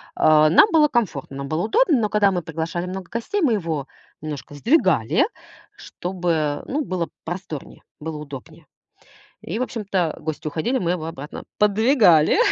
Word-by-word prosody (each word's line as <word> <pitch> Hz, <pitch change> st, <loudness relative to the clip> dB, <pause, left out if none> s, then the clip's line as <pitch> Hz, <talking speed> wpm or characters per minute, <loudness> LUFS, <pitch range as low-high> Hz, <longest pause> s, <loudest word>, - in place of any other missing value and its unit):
А, 155 Hz, 0 st, +5 dB
нам 405 Hz, -, +6 dB
было 305 Hz, -2 st, +6 dB
комфортно, 165 Hz, -, -2 dB
нам 140 Hz, 0 st, -5 dB
было 155 Hz, +2 st, -1 dB
удобно. 335 Hz, -, +3 dB
Но 210 Hz, -, 0 dB
когда 205 Hz, -2 st, +3 dB
мы 180 Hz, -, -1 dB
приглашали 165 Hz, +2 st, -4 dB
много 185 Hz, -1 st, -6 dB
гостей, 310 Hz, -, -2 dB
мы 275 Hz, -9 st, +3 dB
его 160 Hz, -9 st, -2 dB, 0.3 s
немножко 145 Hz, -1 st, -7 dB
сдвигали, 190 Hz, -, +3 dB, 0.5 s
чтобы, 180 Hz, -1 st, -4 dB
э, 150 Hz, -2 st, -1 dB
ну, 295 Hz, +2 st, -1 dB
было 180 Hz, -3 st, -2 dB, 0.2 s
просторнее, 175 Hz, -4 st, -7 dB, 0.2 s
было 155 Hz, 0 st, -5 dB
удобнее. 140 Hz, -3 st, -10 dB, 0.8 s
И, 200 Hz, +8 st, -4 dB
в -, -, 0 dB
общем-то, 195 Hz, -9 st, -2 dB
гости 155 Hz, -1 st, -5 dB
уходили, 170 Hz, -, -1 dB
мы 175 Hz, -6 st, -1 dB
его 160 Hz, -3 st, -3 dB
обратно 150 Hz, -2 st, -8 dB
поддвигали, 210 Hz, -, +4 dB
175 Hz, 160 wpm, -22 LUFS, 155-220 Hz, 0.8 s, нам